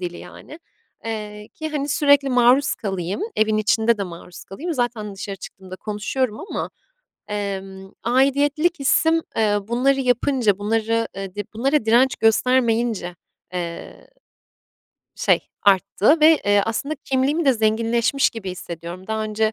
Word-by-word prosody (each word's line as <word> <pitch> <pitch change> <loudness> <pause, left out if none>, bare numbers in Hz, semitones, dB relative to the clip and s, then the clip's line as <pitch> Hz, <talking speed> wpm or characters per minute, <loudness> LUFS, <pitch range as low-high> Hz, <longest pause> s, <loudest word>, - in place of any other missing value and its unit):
dili, 175 -1 -5
yani, 310 - -12 0.5
eee, 210 -2 -6
ki, 315 -1 -5
hani, 290 -2 -3
sürekli 285 -1 +3
maruz 250 +3 +4
kalayım, 190 - -4 0.2
evin 215 0 +2
içinde 220 +1 +2
de - - -1
maruz 175 -1 -9
kalayım. 330 - -5
Zaten 235 -5 -2
dışarı 195 0 -6
çıktığımda 185 -1 -10
konuşuyorum 215 +3 -3
ama, - - -5 0.6
emm, 195 -2 -5
aidiyetlik 285 +7 +2
hissim, 320 +4 +3 0.2
eee, 210 -2 +2
bunları 270 +3 +2
yapınca, 245 -4 +1
bunları, 225 +2 0
eee, 195 -1 -6
dı 205 - -4
bunlara 270 +3 +1
direnç 240 +4 +3
göstermeyince, 225 -5 +1 0.4
eee, 170 -2 -6 1.1
şey - - +3 0.2
arttı. 200 - +3
Ve, 315 +1 +7
eee, 205 0 +4
aslında 275 +7 -2
kimliğim 275 +5 +1
de 270 - +5
zenginleşmiş 230 +5 +1
gibi 205 -5 -6
hissediyorum. 175 0 -8
Daha 220 0 -2
önce, 215 +1 0
225 Hz, 130 wpm, -22 LUFS, 200-265 Hz, 1.1 s, Ve